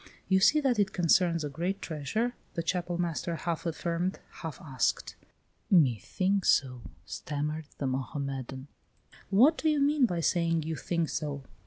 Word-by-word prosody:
"You 190 0 +4
see 300 +10 +5
that 255 -6 +1
it 195 -2 +2
concerns 170 -1 +3
a 150 - -2
great 175 +7 -2
treasure?" 180 - -2 0.2
the 170 - -1
Chapel 175 0 -1
master 170 -1 -2
half 170 +1 -3
affirmed, 170 +3 -2 0.2
half 160 -2 -6
asked. 135 -8 -1 0.5
"Me 140 - +5
think 195 - 0
so," 125 -6 +2 0.2
stammered 150 +1 -4
the 140 - -3
Mohammedan. 135 0 -4 0.6
"What 250 - +5
do 315 - +2
you 300 -1 +2
mean 285 -2 +4
by 175 -5 -2
saying 165 -1 +1
you 160 +1 -3
think 170 0 -1
so? 145 -3 -3
170 Hz, 155 wpm, -29 LUFS, 150-190 Hz, 0.6 s, see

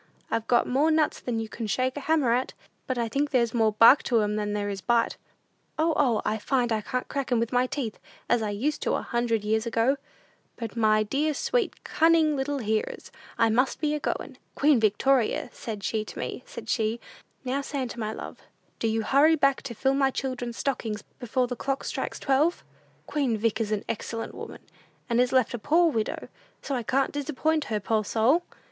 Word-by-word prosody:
I've 225 0 -1
got 240 -1 +4
more 280 +5 +2
nuts 315 -1 +2
than 235 -2 -2
you 225 - -3
can 225 0 -5
shake 255 +5 0
a - - -3
hammer 285 -5 +2
at; 255 +2 -1 0.3
but 255 - -1
I 235 -1 0
think 280 +6 0
there's 235 -5 +1
more 220 -3 +2
bark 230 +6 +7
to 235 -3 +3
'em 210 0 0
than 210 -1 -2
there 205 -1 -1
is 200 -1 -4
bite. 235 +1 +2 0.6
O, 320 +1 +2
O, 245 -7 +2
I 220 +1 0
find 245 +1 0
I 220 -1 +1
can't 250 +4 -3
crack 275 -2 -3
'em 240 - +3
with 230 0 -1
my 250 0 +2
teeth, 260 -6 -4 0.3
as 235 - +2
I 215 - -1
used 260 +9 -1
to - - +1
a - - -2
hundred 235 -3 0
years 220 +2 0
ago! 235 +4 +2 0.6
"But 230 -3 -6
my 215 -2 +3
dear, 290 +7 0
sweet, - - -1
cunning 320 -2 +3
little 280 +1 -1
hearers, 220 -3 -2 0.3
I 230 -1 +3
must 255 +4 +1
be 300 -1 0
a 300 - -1
goin'. - - -4 0.2
Queen 290 -3 +4
Victoria, 230 +3 +2
said 215 -3 -6
she 220 +1 -1
to - - -10
me, - - -4
said 230 -1 -9
she, 220 0 0 0.5
'Now, 265 +2 0
Santa, 265 -4 -4
my 215 -1 -2
love, - - -8 0.4
do 230 - 0
you 225 0 0
hurry 290 +8 +5
back 275 -2 +2
to 250 -3 -7
fill 265 +5 +1
my 275 -1 +3
children's 250 -3 -4
stockings 225 -6 -2 0.2
before 250 +1 0
the 245 0 -4
clock 275 +3 -2
strikes - - -3
twelve.' 295 +5 +1 0.4
Queen 270 -7 0
Vic 225 +1 0
is 215 -1 -2
an 210 -2 -1
excellent 225 +1 -4
woman, - - -9 0.5
and 240 -1 +2
is 250 - +1
left 255 -3 +2
a 240 - -3
poor 330 +7 +3
widow; 220 -5 -2 0.4
so 280 - -3
I 250 - 0
can't 265 +4 +1
disappoint 305 +1 -1
her, 215 -5 -1
poor 215 +2 0
soul! 235 - +3
245 Hz, 205 wpm, -27 LUFS, 220-275 Hz, 0.6 s, bark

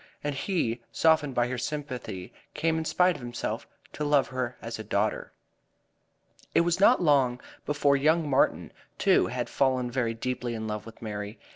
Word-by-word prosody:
And 145 0 -1
he, 135 - -1
softened 155 -4 +3
by 120 0 +2
her 125 0 -3
sympathy, 125 -11 -5 0.2
came 160 0 +1
in 160 - -4
spite 180 +2 +3
of 145 - -9
himself 120 -1 -4 0.3
to 150 - -4
love 145 -2 +3
her 125 -1 -3
as 115 -1 -6
a - - -4
daughter. 105 +1 -1 1.2
It - - +6
was 170 +1 +1
not 205 0 +5
long 135 -5 +3 0.3
before 145 -1 +3
young 155 +3 +2
Martin, 135 -2 +1 0.2
too, - - +4
had - - -3
fallen 130 -2 +1
very 120 -3 -1
deeply 125 0 -3
in 110 -1 -4
love 105 0 -4
with 115 +1 -12
Mary. 105 0 -5
130 Hz, 170 wpm, -28 LUFS, 115-150 Hz, 1.2 s, It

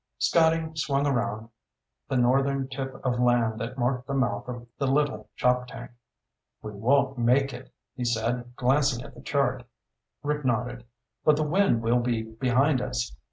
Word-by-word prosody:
Scotty 165 -1 +3
swung 140 -3 0
around 115 -5 -1 0.6
the 135 - +1
northern 135 +2 +2
tip 135 0 -5
of 125 -1 0
land 120 -3 +2
that 115 +4 -5
marked 125 0 -1
the 140 - -2
mouth 125 -6 0
of 120 -1 -6
the 140 - 0
Little 135 -6 0
Choptank. 125 0 -1 0.7
"We 105 - -5
won't 130 +5 +1
make 130 +3 +3
it," 125 +1 -10 0.2
he 125 - -4
said, 120 +1 -1
glancing 130 -1 +1
at - - -12
the 120 - -13
chart. 130 -3 0 0.6
Rick 150 0 -1
nodded. 120 0 -1 0.4
"But 155 - +5
the 155 - 0
wind 155 - +2
will 120 +2 +3
be 120 -2 -1
behind 125 +5 +1
us. 120 -1 -3
125 Hz, 160 wpm, -27 LUFS, 120-140 Hz, 0.7 s, But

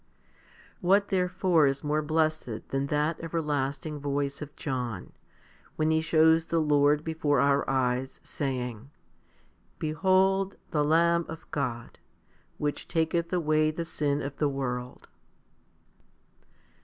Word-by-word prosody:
What 195 +3 +3
therefore 180 -4 +2
is 135 0 -1
more 150 +1 +1
blessed 155 -6 -1
than 135 +1 -1
that 150 +2 0
everlasting 150 -2 -2
voice 140 0 -2
of 150 0 -8
John, 125 - -4 0.6
when 155 0 +1
he 160 0 +2
shows 160 0 +4
the 165 - -1
Lord 150 -1 +3
before 160 -3 0
our 140 0 +2
eyes, 130 0 0
saying, 125 -3 -4 0.9
Behold 190 +4 +2 0.2
the 150 -2 +2
Lamb 170 +2 +3
of 160 -1 -8
God, 120 -5 -4 0.6
which 145 -1 -3
taketh 170 0 0
away 155 -3 +2
the 165 +2 -4
sin 145 -3 -1
of 140 0 -6
the 150 - +1
world. 125 -2 -4
150 Hz, 120 wpm, -28 LUFS, 140-165 Hz, 0.9 s, shows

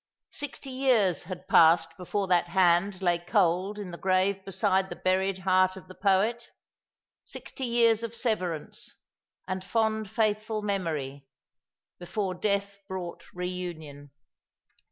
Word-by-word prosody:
Sixty 280 -2 -4
years 245 -10 +2
had 185 +1 -8
passed 165 0 +5
before 195 +2 -2
that 175 -2 +2
hand 185 +2 +2
lay 175 -1 +2
cold 185 +2 +1
in 200 -4 -6
the 170 - -8
grave 190 +1 +1
beside 190 -1 +1
the - - -6
buried 190 +1 +1
heart 185 0 +2
of 190 - -12
the 185 - -11
poet, 205 +5 +1 0.7
sixty 265 - -7
years 230 -2 +3
of 230 0 -5
severance, 185 - -2 0.5
and 185 0 -3
fond 220 0 0
faithful 215 0 0
memory, 155 -9 -3 0.7
before 185 +2 -3
death 200 +1 -1
brought 185 -3 -6
reunion. 175 -6 -6
190 Hz, 125 wpm, -28 LUFS, 175-210 Hz, 0.7 s, passed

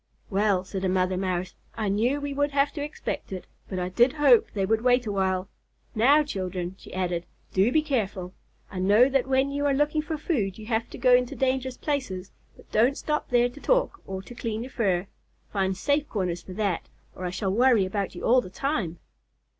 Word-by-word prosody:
"Well," 200 -2 +2
said 190 0 -5
a 190 - +1
mother 185 0 +1
Mouse, 185 -1 -2 0.2
"I 220 -2 -2
knew 230 +8 +1
we 285 0 -4
would 285 +1 +1
have 280 0 +3
to 295 - -5
expect 295 -7 -5
it, 185 -1 -5 0.2
but 185 - -4
I 180 0 -2
did 240 +8 +4
hope 285 -6 +5
they 195 -2 +1
would 220 +2 +1
wait 245 0 +3
a 210 - -2
while. 190 -1 0 0.5
Now, 280 +7 +5
children," 185 -8 -4
she - - -13
added, 175 -2 -2 0.3
"do 195 +5 +3
be 310 +3 +3
careful! 200 -10 -2 0.4
I 185 - -5
know 205 +7 +5
that 270 -1 +1
when 265 +1 +2
you 285 +1 0
are 280 - +2
looking 295 +2 +1
for 315 0 -4
food 225 - -1
you 215 - -9
have 225 0 -1
to - - -9
go 255 -1 +4
into 250 0 +3
dangerous 260 -1 0
places, 225 -11 -3 0.3
but - - -19
don't 245 +6 +3
stop 300 0 -2
there 245 0 +3
to 280 +4 -13
talk - - +1
or 190 0 -5
to 245 - -11
clean 230 -2 -3
your 260 - -9
fur. 190 -7 +1 0.5
Find 190 -2 0
safe 290 +4 0
corners 180 -5 -2
for 185 - -10
that, 195 -3 -2 0.3
or 185 - -6
I - - -1
shall 190 +1 -2
worry 235 -3 +4
about 195 0 -3
you - - -8
all 250 +2 +5
the 185 - -9
time." 205 - -2
220 Hz, 215 wpm, -26 LUFS, 190-270 Hz, 0.5 s, hope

